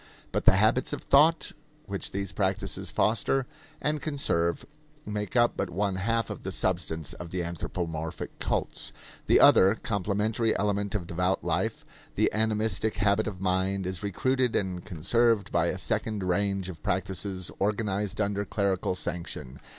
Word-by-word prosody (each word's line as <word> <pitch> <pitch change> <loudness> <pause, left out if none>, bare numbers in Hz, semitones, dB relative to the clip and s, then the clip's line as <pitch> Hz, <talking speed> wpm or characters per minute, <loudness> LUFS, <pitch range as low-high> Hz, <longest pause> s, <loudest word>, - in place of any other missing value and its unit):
But - - -1
the - - +7
habits 110 +6 +2
of - - -4
thought 155 +4 +4 0.3
which 100 0 -3
these 100 -1 -3
practices 95 0 -1
foster 120 +4 +1 0.3
and 150 0 0
conserve 135 - -1 0.4
make 105 0 -4
up 120 -1 +4
but 95 - -2
one 95 +2 -1
half 115 +3 0
of - - -6
the - - -4
substance 80 -5 -1
of 85 - -8
the 90 0 -2
anthropomorphic 80 -1 -4
cults. - - -2 0.4
The - - +6
other, 95 +3 +7
complementary 105 +2 0
element 100 0 0
of 95 -5 -1
devout 90 +3 0
life - - -1 0.3
the - - +2
animistic 110 -1 +1
habit 105 +1 +2
of 95 -3 -5
mind 95 +1 +1
is 95 0 -3
recruited 125 +5 0
and 90 -3 -1
conserved 110 +5 +1
by - - +2
a - - -1
second 105 -3 -1
range 100 +1 0
of 85 -4 -8
practices 95 0 -2
organized 105 0 -1
under 100 -1 0
clerical 100 -3 0
sanction. 85 -7 -5
100 Hz, 150 wpm, -28 LUFS, 90-110 Hz, 0.4 s, the